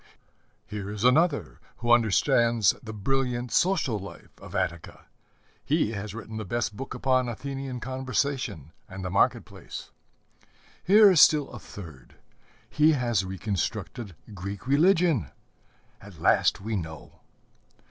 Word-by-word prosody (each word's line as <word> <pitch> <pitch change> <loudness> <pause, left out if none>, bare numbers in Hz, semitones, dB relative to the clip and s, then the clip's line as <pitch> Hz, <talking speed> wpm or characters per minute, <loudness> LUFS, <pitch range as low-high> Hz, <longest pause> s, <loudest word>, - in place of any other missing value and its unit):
Here 100 -1 -6
is 105 +1 -5
another 125 - +2 0.2
who 120 0 -1
understands 115 -1 +3
the 110 - -8
brilliant 125 +2 -2
social 170 - +1
life 95 -4 -11
of - - -10
Attica: 85 -1 -3 0.6
he 105 - +1
has 105 -1 -6
written 110 -1 -7
the 110 - -4
best 115 +1 -2
book 135 +5 -6
upon 130 -1 +1
Athenian 135 +2 -5
conversation 130 - -2 0.2
and 95 0 -7
the 90 - -3
market 100 - +2
place. - - -10 0.9
Here 205 +1 +7
is 175 - +6
still 150 -2 +5
a 120 - -8
third: 75 -14 -12 0.5
he 155 +1 +3
has 120 -7 0
reconstructed 95 +1 -4 0.2
Greek 100 +3 -7
religion: 155 - +3 0.7
at - - -13
last - - +3
we 110 +2 -3
know! 80 -4 -7
115 Hz, 125 wpm, -27 LUFS, 100-135 Hz, 0.9 s, Here